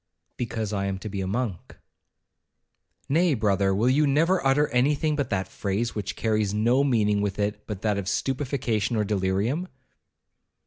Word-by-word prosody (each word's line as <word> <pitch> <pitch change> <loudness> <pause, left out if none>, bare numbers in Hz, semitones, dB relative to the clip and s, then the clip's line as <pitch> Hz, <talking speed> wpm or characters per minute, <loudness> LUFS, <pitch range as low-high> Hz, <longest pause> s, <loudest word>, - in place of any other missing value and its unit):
'Because 110 -3 -3
I 100 -1 -1
am 95 -1 -2
to 105 +3 -7
be 100 -1 -4
a 95 - -3
monk.' 105 -3 -3 1.3
'Nay, 165 +1 +3
brother, 100 -3 +2
will 110 +5 +2
you 145 +4 +3
never 165 +7 +2
utter 135 +2 +3
any 130 +4 +2
thing 150 +1 0
but 140 -2 -2
that 95 -3 -1
phrase, 105 +5 -2
which 105 -3 -4
carries 110 -2 0
no 120 +6 +3
meaning 105 -6 +2
with 100 -1 -2
it 105 0 -2
but 105 -3 -6
that 105 -2 +1
of 95 - -5
stupefaction 125 -2 -1
or 105 - +1
delirium?' 105 - 0
110 Hz, 170 wpm, -25 LUFS, 100-135 Hz, 1.3 s, Nay